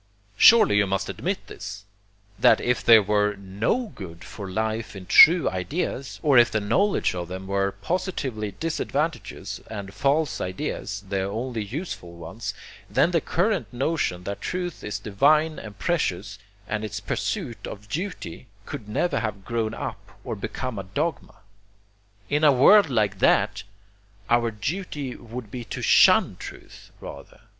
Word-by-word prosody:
Surely 215 - +7
you 100 -1 +3
must 95 0 -1
admit 190 +2 -3
this, 100 0 -8 0.5
that - - +6
if 125 0 0
there 115 -2 +7
were 105 0 +1
NO 100 - -2
good 85 -4 -9
for 100 -3 -8
life 110 +3 -2
in 95 -1 -9
true 165 - +8
ideas, 125 - -3
or 140 -5 +6
if 120 -1 +5
the 110 - 0
knowledge 195 - +1
of 90 -1 -4
them 95 +2 -7
were 100 0 0
positively 135 - -2
disadvantageous 140 - -3
and 100 -2 -7
false 140 +6 +1
ideas 95 +2 -4
the 95 0 -1
only 110 +4 -3
useful 105 - -6
ones, 100 +5 -6 0.3
then 135 - +3
the 165 -2 +2
current 200 +4 0
notion 125 - -1
that 100 +1 -5
truth 180 -2 -4
is 105 -1 -3
divine 150 +10 +2
and 105 -2 -10
precious, 110 - -1 0.3
and 105 0 -2
its 105 -1 -4
pursuit 125 - -3
a - - -5
duty, 125 - -6 0.2
could 115 -8 -7
never 170 +9 0
have 105 -4 -4
grown 115 -2 -2
up - - -7
or - - -4
become 130 -5 -5
a - - -4
dogma. 140 - -3 0.9
In 150 +6 0
a 150 - +7
world 155 +8 +6
like 105 -6 0
that, 105 +1 +3 0.7
our 120 0 +3
duty 140 - -4
would 120 -2 -9
be 125 -1 -5
to - - -6
SHUN - - +5
truth, - - -11
rather. - - -11
110 Hz, 150 wpm, -25 LUFS, 100-150 Hz, 0.9 s, true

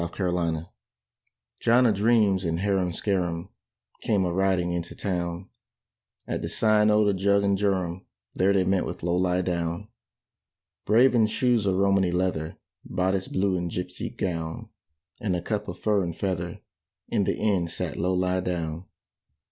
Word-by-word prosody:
THE 85 - -1
BALLAD - - -15
OF - - -1
LOW 90 -1 0
LIE 85 - +1
DOWN 80 +2 -5 0.9
John 120 +2 +4
a 115 - +4
dreams 105 -2 +3
and 85 -1 -1
Harum 95 -3 +1
Scarum 90 -2 -1 0.5
Came 100 -4 +1
a 85 - -1
riding 95 -2 +1
into 85 -1 -4
town: 90 -1 -3 0.8
At - - -3
the - - -3
Sign 110 -1 +3
o' 105 0 +4
the 100 - +3
Jug 100 +1 +2
and 100 0 +2
Jorum 95 -3 -1 0.3
There 95 +2 +2
they 95 -2 +3
met 95 0 +1
with - - -7
Low 85 0 +1
lie 90 0 +1
down. 85 +3 -2 1.0
Brave 120 +5 +5
in 115 -3 +4
shoes 120 -2 +1
of 95 - +2
Romany 95 -1 +3
leather, 90 -3 -1 0.3
Bodice 95 +1 -1
blue 95 0 0
and 90 -1 -2
gipsy 90 +1 -4
gown, 80 -3 -4 0.5
And 105 -7 -1
a 85 - -2
cap 105 -1 -2
of 90 -1 -6
fur 105 -2 +1
and 85 -3 -3
feather, 90 -3 -3 0.5
In - - +1
the - - 0
inn 95 -5 +1
sat - - -4
Low 90 +2 0
lie 90 0 +1
down. 85 -2 -3
95 Hz, 175 wpm, -26 LUFS, 85-100 Hz, 1.0 s, Brave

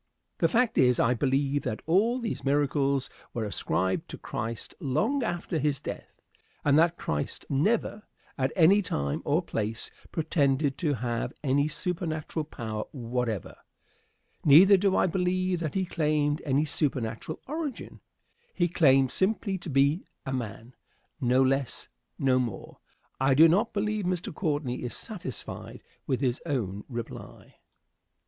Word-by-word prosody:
The - - +4
fact 240 -1 +2
is, 125 -2 +4
I 120 - +4
believe 140 +3 +1
that 110 - -4
all 205 +9 +3
these 235 -3 -4
miracles 140 -1 +1 0.3
were 115 - -1
ascribed 95 -2 -1
to - - -7
Christ 115 +1 -5
long 190 - 0
after 175 -6 -2
his 145 -2 0
death, - - -8 0.5
and 145 -1 +5
that 170 +1 +3
Christ 75 -1 -3
never, 205 +8 0 0.3
at 130 0 0
any 190 +4 +6
time 70 - -2
or - - +2
place, 110 +2 -3 0.2
pretended 145 -3 +1
to 150 -5 +1
have 120 -1 -2
any 145 +1 +2
supernatural 160 -1 -3
power 110 -7 -5
whatever. 120 - -3 0.9
Neither 175 +7 +8
do 195 0 +2
I - - +4
believe 185 0 0
that 160 0 -3
he 190 -1 +1
claimed 150 -3 0
any 140 +3 +2
supernatural 135 -1 -2
origin. 300 -2 -5 0.6
He 175 -2 +2
claimed 135 -6 +4
simply 195 0 0
to 170 - -7
be 140 +5 +2 0.2
a 135 - -3
man; 120 0 -5 0.5
no 130 -1 +3
less, 135 -1 -1 0.3
no 130 -2 +3
more. 115 -6 -5 0.4
I 135 0 +3
do 160 +4 +8
not 195 +7 +2
believe 210 -1 -1
Mr. 180 -2 -2
Courtney 145 -7 -2
is 120 - -4
satisfied 175 - -8 0.2
with 130 - 0
his 130 -2 0
own 105 - -2
reply. 120 -2 -6
Question. - - -23
145 Hz, 140 wpm, -28 LUFS, 130-180 Hz, 0.9 s, Neither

